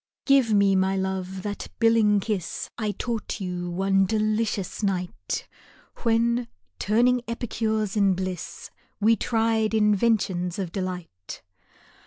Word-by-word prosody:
GIVE 270 Hz, -5 st, +4 dB
me, 200 Hz, -2 st, +4 dB
my 190 Hz, +1 st, +2 dB
lc" 190 Hz, -1 st, -2 dB
e, -, -, -5 dB
that 205 Hz, +1 st, -5 dB
billing 225 Hz, -3 st, +4 dB
kiss 195 Hz, -5 st, -3 dB
I 215 Hz, -2 st, -2 dB
taught 225 Hz, +1 st, -3 dB
you 180 Hz, -2 st, -4 dB
one 195 Hz, +2 st, +2 dB
delicious 215 Hz, -2 st, -1 dB
night, 180 Hz, -, -2 dB, 0.5 s
When, 235 Hz, +1 st, +1 dB, 0.3 s
turning 245 Hz, +4 st, +3 dB
epicures 220 Hz, -2 st, -2 dB
in 200 Hz, -3 st, +3 dB
bliss, 185 Hz, -2 st, -5 dB, 0.3 s
We 220 Hz, +2 st, +4 dB
tried 225 Hz, 0 st, +1 dB
inventions 205 Hz, -4 st, +2 dB
of 190 Hz, -4 st, -3 dB
delight. 180 Hz, -, -6 dB
205 Hz, 120 wpm, -25 LUFS, 190-225 Hz, 0.5 s, GIVE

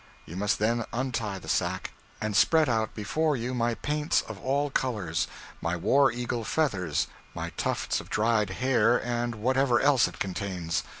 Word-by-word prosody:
You 85 Hz, -, -9 dB
must 100 Hz, +2 st, +1 dB
then 115 Hz, +2 st, +1 dB
untie 115 Hz, -5 st, -2 dB
the 95 Hz, -, -11 dB
sack, -, -, -1 dB, 0.3 s
and 110 Hz, -1 st, -2 dB
spread 150 Hz, +10 st, +5 dB
out 110 Hz, -3 st, 0 dB
before 150 Hz, +8 st, 0 dB
you 125 Hz, +2 st, -3 dB
my 120 Hz, -1 st, 0 dB
paints 150 Hz, +3 st, 0 dB
of 110 Hz, -3 st, -8 dB
all 140 Hz, +2 st, 0 dB
colors, 100 Hz, -12 st, -1 dB, 0.3 s
my 85 Hz, +1 st, -1 dB
war 135 Hz, +9 st, +4 dB
eagle 120 Hz, -1 st, -3 dB
feathers, 105 Hz, -, 0 dB, 0.3 s
my -, -, -4 dB
tufts -, -, -1 dB
of -, -, -14 dB
dried 110 Hz, -2 st, +2 dB
hair, 120 Hz, +2 st, +3 dB
and 120 Hz, -1 st, -1 dB
whatever 130 Hz, +3 st, +2 dB
else 140 Hz, -3 st, +4 dB
it -, -, -9 dB
contains. 90 Hz, -3 st, -2 dB
115 Hz, 165 wpm, -28 LUFS, 105-130 Hz, 0.3 s, spread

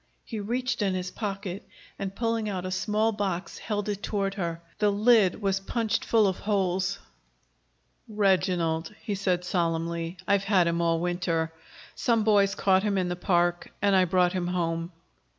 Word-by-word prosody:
He 225 Hz, -, -5 dB
reached 245 Hz, +3 st, -2 dB
in 195 Hz, -2 st, +1 dB
his 180 Hz, 0 st, -3 dB
pocket 195 Hz, -2 st, -4 dB, 0.4 s
and, 195 Hz, -1 st, -4 dB
pulling 230 Hz, -1 st, -1 dB
out 185 Hz, -2 st, -3 dB
a 185 Hz, -, -3 dB
small 215 Hz, +4 st, +1 dB
box, 195 Hz, -4 st, -3 dB
held 205 Hz, -2 st, -3 dB
it 205 Hz, -1 st, -3 dB
toward 195 Hz, -2 st, -1 dB
her. 170 Hz, -4 st, -3 dB, 0.2 s
The 210 Hz, -, +4 dB
lid 210 Hz, -1 st, +4 dB
was 195 Hz, -1 st, +1 dB
punched 220 Hz, +2 st, -1 dB
full 225 Hz, -2 st, +4 dB
of 190 Hz, -2 st, 0 dB
holes. 190 Hz, -2 st, 0 dB, 1.1 s
"Reginald," 185 Hz, -4 st, +1 dB
he 210 Hz, -, -2 dB
said 185 Hz, -2 st, 0 dB
solemnly. 170 Hz, -1 st, -1 dB
"I've 200 Hz, -1 st, +2 dB
had 190 Hz, -3 st, +4 dB
him 170 Hz, 0 st, 0 dB
all 165 Hz, -1 st, +2 dB
winter. 170 Hz, -2 st, -1 dB, 0.4 s
Some 230 Hz, -2 st, +1 dB
boys 200 Hz, -2 st, +3 dB
caught 190 Hz, -2 st, +3 dB
him 205 Hz, -1 st, 0 dB
in 180 Hz, -1 st, 0 dB
the 175 Hz, -, -2 dB
park, 175 Hz, -1 st, +1 dB
and 200 Hz, -1 st, +3 dB
I 185 Hz, -1 st, +5 dB
brought 180 Hz, 0 st, +2 dB
him 180 Hz, -2 st, -1 dB
home." 170 Hz, -1 st, -1 dB
190 Hz, 170 wpm, -27 LUFS, 175-205 Hz, 1.1 s, I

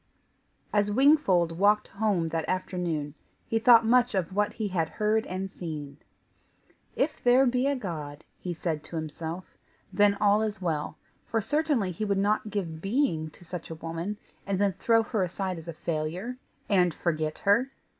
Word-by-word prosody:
As 205 Hz, -1 st, +2 dB
Wingfold 200 Hz, -, +3 dB
walked 210 Hz, +1 st, +3 dB
home 195 Hz, -5 st, 0 dB
that 160 Hz, -1 st, -2 dB
afternoon, 175 Hz, -5 st, -2 dB, 0.3 s
he 225 Hz, -, 0 dB
thought 230 Hz, 0 st, +7 dB
much 245 Hz, 0 st, +3 dB
of 185 Hz, -1 st, -1 dB
what 210 Hz, +1 st, +1 dB
he 215 Hz, -2 st, -3 dB
had 170 Hz, -4 st, 0 dB
heard 215 Hz, +1 st, 0 dB
and 185 Hz, +1 st, -3 dB
seen. 150 Hz, -6 st, -6 dB, 1.0 s
"If 295 Hz, +3 st, -1 dB
there 250 Hz, +2 st, +6 dB
be 250 Hz, +1 st, +2 dB
a 280 Hz, -, +1 dB
God," 155 Hz, -, -6 dB, 0.2 s
he 180 Hz, -, -4 dB
said 160 Hz, -3 st, -3 dB
to -, -, -8 dB
himself, 160 Hz, +3 st, -5 dB, 0.4 s
"then 205 Hz, +1 st, +4 dB
all 205 Hz, +1 st, +3 dB
is 215 Hz, -2 st, -2 dB
well, 160 Hz, -5 st, -2 dB, 0.3 s
for 225 Hz, -, 0 dB
certainly 290 Hz, -5 st, 0 dB
he 180 Hz, +5 st, -4 dB
would 200 Hz, -2 st, +1 dB
not 210 Hz, +2 st, +1 dB
give 170 Hz, -6 st, -4 dB
being 195 Hz, -, 0 dB
to 175 Hz, -, -18 dB
such 180 Hz, 0 st, -7 dB
a 160 Hz, -, -5 dB
woman, 165 Hz, +5 st, -4 dB, 0.3 s
and 200 Hz, -1 st, 0 dB
then 200 Hz, 0 st, +2 dB
throw 225 Hz, +4 st, +3 dB
her 220 Hz, -2 st, -1 dB
aside 185 Hz, 0 st, -2 dB
as 165 Hz, -, -13 dB
a 170 Hz, -, -4 dB
failure, 170 Hz, +10 st, -3 dB, 0.3 s
and 180 Hz, -5 st, +3 dB
forget 155 Hz, -2 st, -1 dB
her. 230 Hz, +7 st, +4 dB
190 Hz, 170 wpm, -28 LUFS, 165-220 Hz, 1.0 s, thought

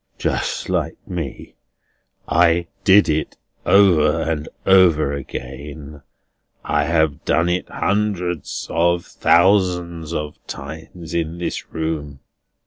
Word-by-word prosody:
"Just -, -, -2 dB
like -, -, -1 dB
me! 85 Hz, -7 st, -6 dB, 0.7 s
I 85 Hz, 0 st, +3 dB, 0.2 s
did 100 Hz, +1 st, +6 dB
it 80 Hz, 0 st, -1 dB, 0.3 s
over 85 Hz, -5 st, +5 dB
and 80 Hz, -2 st, -3 dB, 0.2 s
over 85 Hz, -7 st, +5 dB
again. 70 Hz, +2 st, -8 dB, 0.6 s
I 75 Hz, 0 st, +1 dB
have 80 Hz, -2 st, +1 dB
done 85 Hz, +1 st, +2 dB
it 90 Hz, 0 st, -1 dB
hundreds 95 Hz, -6 st, -2 dB
of 85 Hz, +1 st, +1 dB
thousands 85 Hz, -3 st, +2 dB
of 75 Hz, -2 st, -4 dB
times 80 Hz, +1 st, -8 dB
in 85 Hz, 0 st, -2 dB
this 85 Hz, -, -5 dB
room." 75 Hz, -4 st, -4 dB
85 Hz, 105 wpm, -20 LUFS, 75-90 Hz, 0.7 s, did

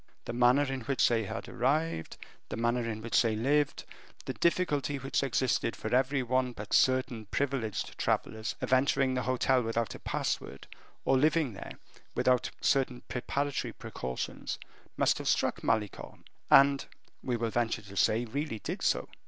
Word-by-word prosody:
The -, -, -4 dB
manner 125 Hz, +3 st, +4 dB
in 135 Hz, -2 st, -3 dB
which 135 Hz, +3 st, +2 dB
they 115 Hz, -2 st, +1 dB
had 110 Hz, +2 st, -5 dB
arrived, 140 Hz, -, -1 dB, 0.3 s
the -, -, -4 dB
manner 115 Hz, 0 st, 0 dB
in 110 Hz, -1 st, -5 dB
which 115 Hz, -, +3 dB
they 115 Hz, -2 st, +1 dB
had 110 Hz, -, -3 dB
lived, 145 Hz, +1 st, +1 dB, 0.4 s
the -, -, -3 dB
difficulty 145 Hz, -6 st, +1 dB
which 135 Hz, +1 st, -1 dB
existed 130 Hz, -3 st, 0 dB
for 110 Hz, -, -4 dB
every 130 Hz, +1 st, +2 dB
one 125 Hz, 0 st, 0 dB
but 105 Hz, -2 st, -7 dB
certain 130 Hz, -4 st, +2 dB
privileged 130 Hz, -4 st, -2 dB
travelers, 110 Hz, +1 st, -1 dB
of -, -, 0 dB
entering 130 Hz, 0 st, +3 dB
the 130 Hz, -, 0 dB
hotel 130 Hz, 0 st, +2 dB
without 115 Hz, 0 st, -1 dB
a -, -, -9 dB
password, 70 Hz, -, -3 dB, 0.4 s
or 135 Hz, -1 st, +4 dB
living 155 Hz, -3 st, +2 dB
there 100 Hz, -, -8 dB, 0.4 s
without 125 Hz, -1 st, +2 dB
certain 130 Hz, -3 st, +1 dB
preparatory 140 Hz, +3 st, -2 dB
precautions, 65 Hz, 0 st, -5 dB, 0.4 s
must -, -, +2 dB
have -, -, -5 dB
struck -, -, +1 dB
Malicorne; 105 Hz, -2 st, -2 dB, 0.3 s
and, 140 Hz, 0 st, +6 dB, 0.4 s
we 125 Hz, -2 st, -1 dB
will 115 Hz, -1 st, -1 dB
venture 115 Hz, -2 st, 0 dB
to 100 Hz, -1 st, -12 dB
say, 110 Hz, +6 st, +2 dB
really 140 Hz, 0 st, -3 dB
did -, -, -5 dB
so. -, -, +1 dB
125 Hz, 160 wpm, -30 LUFS, 115-135 Hz, 0.4 s, and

